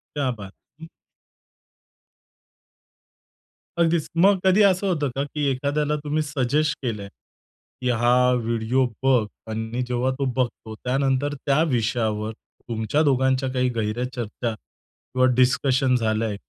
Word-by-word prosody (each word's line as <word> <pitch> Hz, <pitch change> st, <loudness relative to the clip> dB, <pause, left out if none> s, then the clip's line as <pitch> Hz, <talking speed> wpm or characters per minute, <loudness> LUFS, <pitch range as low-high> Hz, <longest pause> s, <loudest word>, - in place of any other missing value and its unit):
क्या 140 Hz, -3 st, 0 dB
बात 100 Hz, -4 st, -9 dB, 0.3 s
है! -, -, -7 dB
हं. -, -, -15 dB, 2.9 s
अगदीच. 165 Hz, -2 st, +2 dB
मग 195 Hz, +2 st, +5 dB
कधी 190 Hz, +3 st, +5 dB
असं 195 Hz, 0 st, +3 dB
होतं 150 Hz, -7 st, 0 dB
का? 140 Hz, -, 0 dB
की 145 Hz, 0 st, -3 dB
एखाद्याला 145 Hz, +3 st, 0 dB
तुम्ही 150 Hz, +1 st, 0 dB
सजेस्ट 150 Hz, +1 st, 0 dB
केलंय 105 Hz, -6 st, -3 dB, 0.7 s
की 125 Hz, -, 0 dB
"हा 120 Hz, 0 st, +2 dB, 0.2 s
व्हिडिओ 115 Hz, +2 st, +1 dB, 0.2 s
बघ" 125 Hz, -5 st, +4 dB, 0.3 s
आणि 110 Hz, +3 st, -3 dB
जेव्हा 125 Hz, +1 st, 0 dB
तो 135 Hz, -, +1 dB
बघतो 120 Hz, -3 st, -2 dB
त्यानंतर 135 Hz, +3 st, 0 dB
त्या 140 Hz, +2 st, +3 dB
विषयावर 110 Hz, -2 st, 0 dB
तुमच्या 115 Hz, +5 st, -3 dB
दोघांच्या 130 Hz, -1 st, +2 dB
काही 125 Hz, 0 st, +1 dB
गेह्ऱ्या 110 Hz, +2 st, -1 dB
चर्चा 115 Hz, 0 st, -3 dB
किंवा 130 Hz, +4 st, -4 dB
डिस्कशन 130 Hz, +1 st, +3 dB
झालंय? 110 Hz, -2 st, 0 dB
130 Hz, 125 wpm, -23 LUFS, 115-145 Hz, 2.9 s, मग